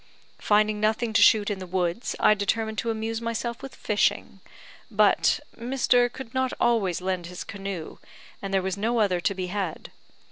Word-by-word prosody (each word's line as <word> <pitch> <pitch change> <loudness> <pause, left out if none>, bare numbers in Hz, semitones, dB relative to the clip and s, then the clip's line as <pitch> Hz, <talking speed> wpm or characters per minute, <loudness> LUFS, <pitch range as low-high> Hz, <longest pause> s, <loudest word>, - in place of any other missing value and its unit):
"Finding 210 0 +2
nothing 220 +2 0
to - - +4
shoot 210 -1 +5
in 200 - -3
the 185 - -7
woods, 180 +3 -2
I - - +6
determined 220 +1 -1
to 230 - -2
amuse 225 0 -2
myself 230 +1 -3
with 270 - -9
fishing; 210 -1 0 0.5
but 210 +3 +3 0.2
Mr. 245 0 +2
could 255 -2 -9
not 260 -1 0
always 200 -8 +1
lend 185 -2 -2
his 180 0 -7
canoe, 195 -4 -6 0.4
and 195 - -5
there 195 -1 +1
was 190 +1 -2
no 230 +3 0
other 190 -4 +2
to 200 - 0
be 185 -1 -3
had. 185 -3 -4
210 Hz, 175 wpm, -26 LUFS, 190-230 Hz, 0.5 s, I